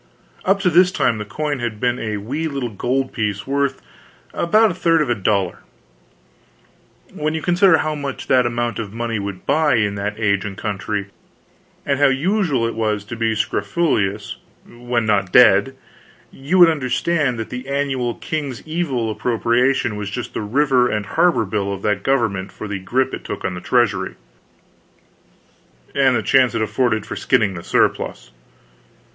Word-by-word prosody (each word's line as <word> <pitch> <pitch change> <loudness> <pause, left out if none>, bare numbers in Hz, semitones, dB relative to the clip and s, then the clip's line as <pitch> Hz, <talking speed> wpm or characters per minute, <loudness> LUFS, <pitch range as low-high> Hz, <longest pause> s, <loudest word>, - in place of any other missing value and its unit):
Up 195 +1 +3
to 180 - +2
this 180 +2 +5
time 115 - +1
this 105 - -6
coin 145 +4 -3
had 115 -3 -4
been 125 +1 0
a 110 -2 -3
wee 140 +11 -3
little 135 -6 -4
gold 130 +6 -1
piece 105 -3 -2
worth 140 0 -1 0.5
about 215 +5 +3
a - - -4
third 165 -2 +2
of 150 -5 0
a - - +4
dollar. 100 -4 0 1.5
When 155 +1 -2
you 160 - -4
consider 175 +1 +4
how 155 +1 -1
much 140 -2 -5
that 125 -2 +3
amount 120 0 -2
of 105 -3 -5
money 115 0 -3
would 100 -2 -6
buy, 150 -1 +3
in 105 -3 +1
that 105 +1 -3
age 100 -3 +1
and 105 -1 -6
country, 100 -1 -3 0.8
and 140 -1 0
how 145 - +6
usual 145 - +1
it 115 - -3
was 105 -2 -1
to 115 - -7
be 115 -1 0
scrofulous, 100 - -1 0.3
when 120 -1 -2
not 100 -3 +1
dead, 120 +2 +5 0.6
you 140 +7 -1
would 175 -2 +8
understand 145 -1 0
that 110 - -6
the 125 +2 -6
annual 135 -4 -1
king's 145 -6 -5
evil 140 -9 -1
appropriation 120 +2 +1
was 105 -1 -4
just 110 +3 -5
the - - -3
River 125 +3 +2
and 105 -1 -2
Harbor 140 - +2
bill 100 0 -2
of 100 -1 -6
that 105 -2 0
government 110 -7 0
for 110 - -8
the 100 -1 -4
grip 130 +7 -1
it - - -6
took - - -6
on - - -1
the 90 - -7
treasury 120 -4 +1 1.8
and 135 -2 +3
the 110 - 0
chance 130 0 +3
it 115 - 0
afforded 110 -2 0
for - - -6
skinning 110 -6 +1
the 85 - -7
surplus. - - 0
120 Hz, 170 wpm, -20 LUFS, 105-140 Hz, 1.8 s, would